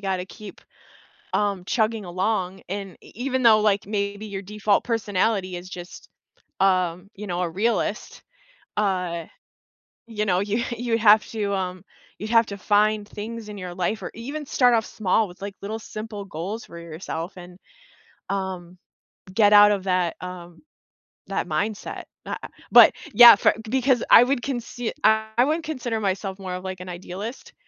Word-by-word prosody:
gotta 190 -2 -2
keep, 205 +1 -11 0.7
um, 200 -3 0
chugging 220 +1 0
along 185 +1 -2
and 195 -1 -5
e - - -16
even 260 +3 -2
though 220 -3 +6
like 205 -2 +1
maybe 205 0 -3
your 200 -1 -5
default 210 +1 0
personality 205 -4 0
is 175 +1 -8
just, 175 -1 -10 0.5
um, 185 -1 +1
you 210 +1 -8
know, 175 -1 -2
a 175 - 0
realist, 215 +7 -2 0.6
uh, 180 -5 -1 0.8
you 215 -2 -3
know, 180 -1 +2
you 205 +4 -1
you 235 -1 0
have 215 -1 +6
to, 205 -3 -2
um, 185 -2 -3 0.4
you'd 215 - -6
have 230 -1 +5
to 200 -2 -7
find 210 +1 +2
things 220 +1 -7
in 210 - -7
your 180 -2 -6
life 185 +4 -2
or - - -5
even 280 +7 -6
start 250 -2 +3
off 225 -1 +1
small 215 +1 +1
with 175 - -15
like 200 0 -5
little 215 +3 -4
simple 215 -2 -7
goals 195 +5 -5
for 170 - -11
yourself 170 +1 -6
and, 180 0 -12 0.7
um, 185 -3 -4 0.6
get 210 0 +5
out 205 0 +8
of 200 -2 -1
that, 180 -3 +1
um, 175 -2 -9 0.7
that 195 - -2
mindset, 195 +7 -3 0.2
a - - -3
ah, - - -5 0.2
but - - +9 0.2
yeah, 240 -1 +11
for - - +3 0.2
because 260 -1 +2
I 235 - +10
would 255 0 0
consi 240 -2 -4
I 220 +2 +3
wouldn't 315 +3 0
consider 245 -7 -3
myself 195 0 -2
more 185 -2 -5
of 180 - -7
like 190 -1 -5
an 180 - -8
idealist, 185 +7 -7
205 Hz, 165 wpm, -24 LUFS, 185-220 Hz, 0.8 s, yeah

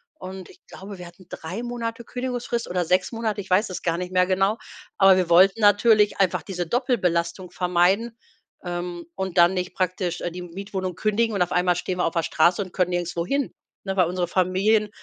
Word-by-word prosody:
und 190 - -9
ich - - -18
glaube, 195 +1 -10
wir 180 -1 -9
hatten 175 +1 -17
3 180 +8 -6
Monate 235 -1 -5
Kündigungsfrist 245 -2 -4
oder 180 -1 -1
6 185 +5 +1
Monate, 220 -3 -2
ich 190 - -13
weiß 195 +4 +2
es 185 - -6
gar 165 -1 0
nicht 180 +1 -5
mehr 180 0 +4
genau, 195 +3 +1 0.4
aber 195 -1 +6
wir 180 -2 0
wollten 190 +5 +5
natürlich 210 +1 +4
einfach 180 -3 +2
diese 175 -3 -4
Doppelbelastung 180 -8 -1
vermeiden, 185 +7 +1 0.5
ähm, 175 -1 -5
und 190 -2 -4
dann 175 +2 +6
nicht 180 0 -3
praktisch, 185 -1 -2
äh, 175 - -3
die 180 - -7
Mietwohnung 185 0 -5
kündigen 215 +3 0
und 195 - -1
auf 180 - +1
einmal 180 0 +2
stehen 180 +1 -3
wir - - +2
auf 165 - -1
der 165 -2 0
Straße 175 +5 +2
und 185 -3 -7
können 180 -2 +1
nirgendwo 175 -1 -2
hin, 280 +5 -1 0.3
ne, 195 - -2
weil 185 -3 +3
unsere 180 0 -2
Familien 195 +4 +2
185 Hz, 205 wpm, -24 LUFS, 175-210 Hz, 0.5 s, aber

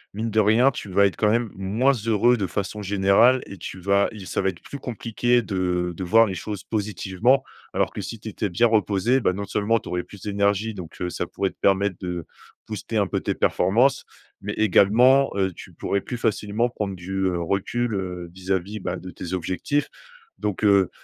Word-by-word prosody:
mine 110 +2 -2
de 110 - +2
rien, 110 +6 +5
tu 105 - -7
vas 100 +2 +4
être 100 - 0
quand 105 - +3
même 115 -1 +1
moins 105 +8 +1
heureux 115 0 +2
de 100 -5 -2
façon 100 +2 -4
générale 100 +6 +4
et 100 - -10
tu 95 - -7
vas 100 +2 +2
il 105 -4 -9
ça - - -1
va 95 - +1
être 85 -3 -9
plus 140 - -8
compliqué 120 0 0
de 90 -3 -1
de 95 - -5
voir 115 +6 +5
les 100 - -3
choses 100 +3 -5
positivement. 105 +4 0 0.3
Alors - - +1
que - - -5
si 115 - -6
tu 110 - -10
étais 105 0 -3
bien 90 +7 +2
reposé, 110 +2 +2
bah, 90 - +1
non 100 +2 -4
seulement 105 +3 +1
tu - - -10
aurais 90 0 -1
plus 100 - -14
d'énergie, 100 +1 0
donc, 90 -5 -9
heu, 90 0 -2
ça 90 - -3
pourrait 95 +2 -2
te - - -30
permettre 100 -1 +2
de 90 -3 -4 0.4
booster - - -4
un - - +3
peu - - -2
tes - - -2
performances, 120 +8 +2 0.4
mais 100 +1 -4
également, 115 +7 +5
heu, 95 -1 +1
tu - - -12
pourrais 100 - -1
plus 125 - -5
facilement 110 +1 0
prendre 105 -5 -4
du, 90 +1 -9
heu, 90 -2 0
recul, 100 +7 -1
heu, 90 -3 -4
vis-à-vis 95 +2 -3
bah - - -3
de 90 - -8
tes 90 0 -7
objectifs. 95 - -1 0.5
Donc 105 0 -3
heu, 100 -3 +5
100 Hz, 210 wpm, -24 LUFS, 95-115 Hz, 0.5 s, rien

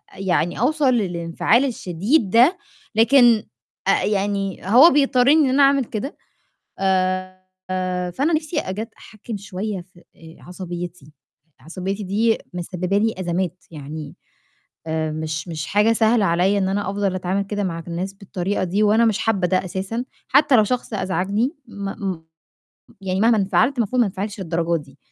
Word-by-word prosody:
يعني 180 -2 -1
أوصل 275 0 +2
للإنفعال 185 +4 +1
الشديد 210 - 0
ده، 250 - +5 0.4
لكن 235 -1 +5 0.4
آآ - - +3
يعني 195 -2 -1
هو 250 - +8
بيضطرّني 275 -1 +4
إن 275 - +3
أنا 280 +2 +4
أعمل 275 -1 +4
كده، 220 +6 -5 0.6
آآ 185 -1 0 0.7
فأنا 290 - 0
نِفْسي 310 +1 -1
أجت 215 +5 -5
أحكِّم 215 0 -8
شوية 200 0 -5
في 175 -1 -20
آآ 165 0 -15
عصبيّتي، 175 -4 -8 0.5
عصبيّتي 185 +7 -5
دي 220 +4 +1 0.2
مسبّبة 180 +2 -2
لي 220 +2 +1
أزمات، 180 0 -3
يعني 150 0 -8 0.7
آآ 160 -1 -1
مش 155 +1 -4
مش 160 -2 -4
حاجة 210 +3 +3
سهلة 225 -1 +3
عليّا 185 +3 +2
إن 190 - 0
أنا 195 0 -1
أفضل 200 -2 -1
أتعامل 185 +2 -1
كده 205 +1 -3
مع 165 -3 -3
الناس 180 +3 -4
بالطريقة 195 0 -3
دي 200 +4 0
وأنا 220 +3 +4
مش 215 -3 +1
حابّة 200 -5 +1
ده 185 +1 0
أساسًا، 195 +7 -4 0.2
حتّى 280 0 +5
لو 215 - +6
شخص 245 -1 -3
أزعجني 195 - -1 0.2
م 195 -2 -4 0.9
يعني 190 0 -1
مهما 225 0 +4
انفعلت 225 +7 +2
المفروض 240 +2 +1
ما 235 - +4
أنفعلش 200 +1 -5
للدرجة 170 -1 0
دي، 140 0 -19
195 Hz, 150 wpm, -21 LUFS, 180-225 Hz, 0.9 s, هو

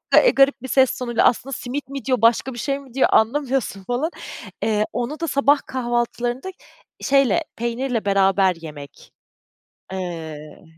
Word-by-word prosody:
eee, - - +7
garip 275 -1 +3
bir 260 - -6
ses 260 +1 +3
tonuyla 240 -2 0
aslında 270 +3 +1
simit 265 +3 -5
mi 275 -1 -6
diyor 255 -4 +1
başka 235 +3 +3
bir 240 - -7
şey 275 +3 -1
mi 270 -4 -15
diyor 265 - +3
anlamıyorsun 250 -4 +1
falan. 245 - -1 0.5
Eee, 215 -1 +1
onu 245 +6 -3
da 335 - -2
sabah 280 0 +3
kahvaltılarında 240 +4 -2 0.5
şeyle 275 +4 +3
peynirle 235 -1 -2
beraber 195 -2 +3
yemek, 145 -3 -11 0.8
eee, 170 -4 -5
d 150 +1 -13
245 Hz, 150 wpm, -22 LUFS, 210-275 Hz, 0.8 s, eee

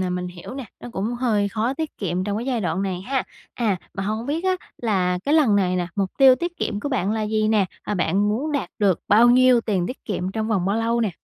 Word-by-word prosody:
nè, 185 - 0
mình 180 0 -3
hiểu 180 +8 -9
nè. 270 - -5 0.2
Nó - - -8
cũng 210 +5 -2
hơi 220 -5 +1
khó 230 +5 -1
tiết 315 -1 -5
kiệm 185 -1 -2
trong 205 0 -2
cái 235 - -5
giai 250 -4 0
đoạn 180 0 -1
này 185 -2 -2
ha? 260 +6 -1 0.3
À, 220 -5 0 0.2
mà 195 - -3
hông 215 +4 -3
biết 315 +5 -2
á, 370 -1 +2 0.2
là, 185 -6 0
cái 290 - +2
lần 260 -10 +4
này 185 -2 +1
nè, 175 -1 -1
mục 195 -2 0
tiêu 265 -1 +8
tiết 345 +5 -4
kiệm 205 -1 -2
của - - -3
bạn 215 -7 0
là 220 - -1
gì 215 0 0
nè? 215 -3 +3 0.2
Ờ, 210 - -3
bạn 200 +2 +1
muốn 265 +9 -1
đạt 285 - -2
được 200 -5 +2
bao 225 +4 +6
nhiêu 255 -1 +5
tiền 190 -6 -1
tiết 255 - -7
kiệm, 185 -3 -3
trong 220 +1 -2
vòng 195 -5 +1
bao 200 - +1
lâu 230 +1 +1
nè? 220 -4 +1
215 Hz, 265 wpm, -23 LUFS, 195-250 Hz, 0.3 s, tiêu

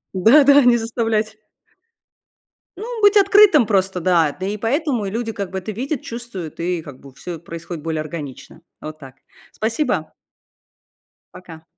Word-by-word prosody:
Да, 225 +11 +6
да, 280 +1 +7
не 245 -1 +5
заставлять. 225 -2 -2 1.4
Ну, 455 +3 -6
быть 410 0 +5
открытым 400 - +6
просто, 190 -3 0
да, 165 -4 +2
да, 185 - -5
и 210 - -3
поэтому 245 +1 -1
и 195 - -3
люди 225 0 -3
как 200 -3 -6
бы 190 - -3
это 215 +4 -6
видят, 260 +6 -4
чувствуют, 230 -10 -8
и 175 0 -2
как 140 -4 -12
бы 135 -1 -15
всё 165 +5 -8
происходит 170 0 -8
более 160 -1 -2
органично. 155 0 -9 0.2
Вот 155 0 -8
так. 135 -2 -13 0.4
Спасибо. 215 - -2 1.2
Пока. 165 -3 -13
200 Hz, 155 wpm, -20 LUFS, 165-240 Hz, 1.4 s, да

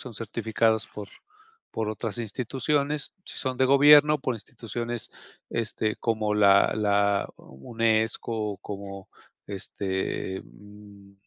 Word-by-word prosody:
son 125 -3 -8
certificadas 110 0 0
por 105 -2 -9 0.6
por 110 -1 -2
otras 110 +1 -3
instituciones, 140 +6 -1
si - - -5
son 130 -2 -2
de 130 - +3
gobierno 145 +2 +7
por 130 - -1
instituciones 115 +2 -5 0.4
este 110 -1 -1
como 110 -2 -1
la 100 -1 +5
la 100 -1 +2
UNESCO, 110 - -1
como, 100 -1 -8 0.4
este, 95 -1 -3
mm, 100 -1 -16
110 Hz, 105 wpm, -26 LUFS, 100-120 Hz, 0.6 s, gobierno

